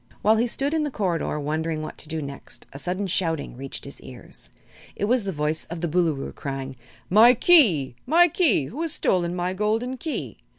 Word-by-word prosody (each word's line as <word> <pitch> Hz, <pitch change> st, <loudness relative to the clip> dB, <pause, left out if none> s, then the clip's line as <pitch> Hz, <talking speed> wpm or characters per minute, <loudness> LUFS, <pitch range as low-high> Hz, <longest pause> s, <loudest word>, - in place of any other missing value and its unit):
While 220 Hz, +1 st, +5 dB
he 235 Hz, +2 st, +2 dB
stood 275 Hz, +5 st, 0 dB
in 320 Hz, -, +1 dB
the 300 Hz, -, -1 dB
corridor 180 Hz, -, -1 dB
wondering 155 Hz, +2 st, -2 dB
what -, -, -8 dB
to 155 Hz, -, -3 dB
do 160 Hz, -1 st, -3 dB
next 140 Hz, 0 st, -8 dB
a 140 Hz, -, -7 dB
sudden 185 Hz, +5 st, -2 dB
shouting 165 Hz, -7 st, -1 dB
reached 135 Hz, +2 st, -6 dB
his 140 Hz, -, -10 dB
ears. 120 Hz, -, -10 dB, 0.5 s
It -, -, -1 dB
was 235 Hz, 0 st, +1 dB
the 195 Hz, -, -1 dB
voice 150 Hz, -1 st, -1 dB
of 170 Hz, 0 st, -7 dB
the 170 Hz, -, 0 dB
Boolooroo, 160 Hz, -4 st, 0 dB
crying: 135 Hz, -2 st, -5 dB, 0.3 s
"My 230 Hz, +6 st, +7 dB
Key 220 Hz, -, +5 dB
my 340 Hz, +5 st, +6 dB
Key! 300 Hz, -, +2 dB
Who 260 Hz, -, -6 dB
has 330 Hz, -2 st, -2 dB
stolen 175 Hz, -1 st, 0 dB
my 180 Hz, +1 st, -1 dB
golden 220 Hz, +6 st, -1 dB
Key?" 315 Hz, +4 st, -5 dB
180 Hz, 200 wpm, -24 LUFS, 150-235 Hz, 0.5 s, My